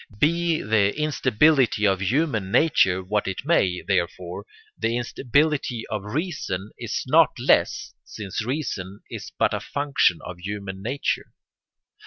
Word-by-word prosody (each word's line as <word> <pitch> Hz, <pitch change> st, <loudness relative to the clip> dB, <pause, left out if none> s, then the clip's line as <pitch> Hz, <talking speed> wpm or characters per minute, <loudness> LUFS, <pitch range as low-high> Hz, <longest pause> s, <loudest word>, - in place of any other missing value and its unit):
Be 165 Hz, +4 st, +1 dB
the 105 Hz, +3 st, +2 dB
instability 135 Hz, -4 st, +3 dB
of 95 Hz, -2 st, +2 dB
human 110 Hz, -, 0 dB
nature 95 Hz, -, +3 dB
what 105 Hz, +2 st, -1 dB
it 95 Hz, +7 st, -4 dB
may, 95 Hz, -, +2 dB
therefore, 90 Hz, 0 st, -2 dB, 0.3 s
the 115 Hz, +1 st, -1 dB
instability 135 Hz, 0 st, 0 dB
of 105 Hz, -2 st, -2 dB
reason 145 Hz, -, -3 dB
is -, -, -3 dB
not -, -, +4 dB
less, -, -, +2 dB
since 105 Hz, +1 st, -5 dB
reason 105 Hz, -7 st, -4 dB
is -, -, -7 dB
but -, -, +2 dB
a -, -, -1 dB
function 140 Hz, -, +1 dB
of 90 Hz, -1 st, -8 dB
human 95 Hz, 0 st, -6 dB
nature. 130 Hz, +7 st, -2 dB
110 Hz, 130 wpm, -24 LUFS, 95-145 Hz, 0.3 s, not